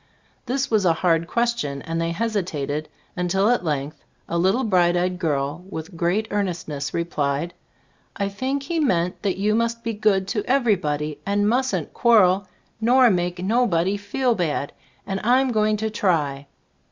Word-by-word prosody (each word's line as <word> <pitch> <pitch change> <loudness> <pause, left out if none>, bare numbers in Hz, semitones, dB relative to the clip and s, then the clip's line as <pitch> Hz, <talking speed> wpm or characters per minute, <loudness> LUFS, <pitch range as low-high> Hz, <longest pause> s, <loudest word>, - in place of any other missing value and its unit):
This 270 +1 -1
was 215 -3 +3
a 170 -3 +4
hard 165 -1 +3
question, 235 -12 -1
and 165 0 -3
they 165 - 0
hesitated, 170 -7 -2 0.3
un 180 0 -1
til 195 +5 +2
at 245 - +1
length 150 -2 -3 0.2
a - - -3
little 190 +9 +2
bright 180 -4 +3
eyed 180 0 -1
girl 150 0 -1
with 165 0 -7
great 180 +6 0
earnestness 165 -9 -2
replied: 165 -1 -2 0.6
"I 200 - -1
think 260 +8 -2
He 330 +4 -2
meant 180 - 0
that 195 -3 -1
you 210 +2 +1
must 230 +1 0
be 230 - -2
good 205 -3 +1
to 210 0 -1
everybody, 175 - 0
and 205 +1 +1
mustn't 255 +4 0
quarrel 200 -5 +4 0.3
nor 245 +1 +5
make 175 -1 -1
nobody 195 -4 +2
feel 240 +5 0
bad, 160 -7 -2 0.3
and 195 -1 -3
Fm 255 +4 +3
go 215 -2 +2
ing 215 0 +1
to 220 +1 -2
try." 150 -10 0
190 Hz, 165 wpm, -23 LUFS, 165-225 Hz, 0.6 s, nor